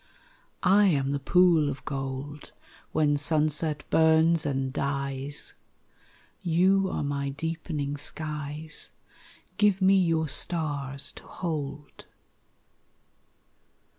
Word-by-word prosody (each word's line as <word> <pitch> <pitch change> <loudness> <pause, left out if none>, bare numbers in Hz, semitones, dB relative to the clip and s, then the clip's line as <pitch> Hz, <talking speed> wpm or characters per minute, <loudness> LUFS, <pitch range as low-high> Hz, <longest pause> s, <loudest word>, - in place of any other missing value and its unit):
I 195 +3 +5
am 140 -6 +1
the 140 - -1
pool 165 0 +4
of 135 -1 -7
gold 135 +1 -6 0.4
When 150 -2 +2
sunset 150 0 +1
burns 160 0 +4
and 135 -1 -2
dies 140 0 -4 0.9
You 190 +3 +2
are - - -2
my 140 -1 -2
deepening 150 -1 -4
skies; 150 +1 -5 0.7
Give 205 -2 +3
me 190 0 +5
your 165 -3 +1
stars 140 -3 0
to - - -14
hold. 145 -4 -6
150 Hz, 95 wpm, -27 LUFS, 140-165 Hz, 0.9 s, I